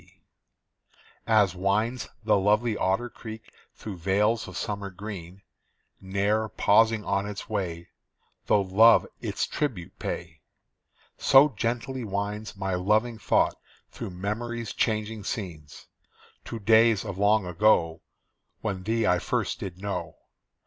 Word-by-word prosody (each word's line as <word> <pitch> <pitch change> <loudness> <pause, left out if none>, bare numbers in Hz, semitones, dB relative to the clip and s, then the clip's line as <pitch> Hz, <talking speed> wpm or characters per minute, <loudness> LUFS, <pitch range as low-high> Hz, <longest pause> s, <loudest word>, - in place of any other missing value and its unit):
C. - - -24 1.1
As 105 -5 +4
winds 105 +6 -1
the 110 - +3
lovely 105 +3 +2
Otter 95 +6 0
Creek 110 -2 -10 0.2
through 105 -4 -7
vales 105 +6 +1
of 90 0 -8
summer 100 -1 -3
green, 95 -1 -9 0.6
Ne'er 100 +3 0
pausing 110 +1 +3
on 100 0 0
its 105 -1 -6
way, 85 -5 -4 0.6
Though 100 - +4
love 110 +5 +6
its - - -2
tribute 115 - -4
pay, - - -5 0.8
So 135 +2 +6
gently 120 +2 -3
winds 105 0 -4
my 95 -1 -2
loving 110 +5 +1
thought - - +1 0.3
through - - -6
memory's 110 +5 -4
changing 110 -1 -1
scenes, 85 - -6 0.6
To 115 - -5
days 110 0 +4
of 95 - -6
long 105 0 +3
ago 85 -3 +2 0.6
When 100 -4 -3
thee 110 +3 0
I 90 -3 +3
first - - -2
did 90 -1 -7
know. 90 -5 -4
105 Hz, 125 wpm, -27 LUFS, 95-110 Hz, 1.1 s, love